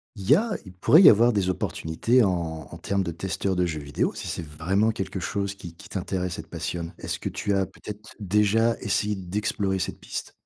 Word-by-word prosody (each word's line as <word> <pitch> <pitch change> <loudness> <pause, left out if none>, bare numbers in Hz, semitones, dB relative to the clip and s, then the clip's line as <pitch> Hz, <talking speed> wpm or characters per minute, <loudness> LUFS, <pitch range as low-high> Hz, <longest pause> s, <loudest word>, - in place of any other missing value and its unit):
Il 100 -1 -7
y 145 - +9
a 225 +6 0
il 95 - -11
pourrait 140 - +6
y - - +11
avoir 115 +3 +5
des 95 -3 +1
opportunités 95 +8 +1
en 80 -6 -1
en - - -8
termes 100 -1 -1
de 85 - -3
testeurs 95 +2 -2
de 90 - +2
jeux 80 -3 -3
vidéo 70 0 -1
si - - -6
c'est 85 - -4
vraiment 90 +9 +1
quelque 95 -2 -4
chose 100 +2 -2
qui 85 -3 -10
qui 105 +5 -14
t'intéresse 90 -2 -3
et 80 - -6
te - - -24
passionne. 85 0 -4
Est-ce - - -3
que - - -3
tu 100 - -2
as 95 -1 +2
peut-être 105 +3 -10
déjà 105 +3 +2
essayé 105 +1 0
d'explorer 95 +1 -1
cette 95 - -3
piste? - - -6
95 Hz, 220 wpm, -26 LUFS, 85-105 Hz, -, y